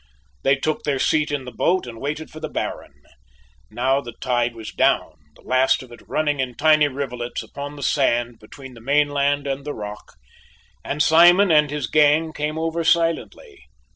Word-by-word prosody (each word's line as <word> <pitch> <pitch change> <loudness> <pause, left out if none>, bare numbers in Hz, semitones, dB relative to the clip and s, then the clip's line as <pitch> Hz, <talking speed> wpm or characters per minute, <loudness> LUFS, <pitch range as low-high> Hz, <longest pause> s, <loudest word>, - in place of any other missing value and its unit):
They 135 +1 +3
took 155 +3 -2
their 145 -2 -1
seat 150 +3 +1
in 145 -3 -3
the 125 - -8
boat 180 +9 0
and 115 -2 -10
waited 150 +3 -4
for 155 - -10
the 155 -1 -5
Baron. - - -6 0.7
Now 130 +5 0
the 120 -3 -9
tide 120 -2 -1
was 110 -1 -8
down, - - +1 0.2
the - - -21
last 130 +1 +2
of 125 - -15
it 120 - -13
running 150 -2 0
in 125 -2 -2
tiny 155 +1 +4
rivulets 125 -3 -5
upon 145 +1 -8
the 145 - -8
sand 120 -5 0
between 130 +4 -12
the 115 - -14
mainland 145 +1 +1
and 140 0 -3
the 145 0 -5
rock, 105 0 -9 0.7
and 150 +1 0
Simon 175 +4 +6
and 150 -2 +4
his 145 -2 -3
gang 155 +5 +3
came 150 +1 -3
over 165 +1 -2
silently. 165 - -1
145 Hz, 180 wpm, -22 LUFS, 125-155 Hz, 0.7 s, Simon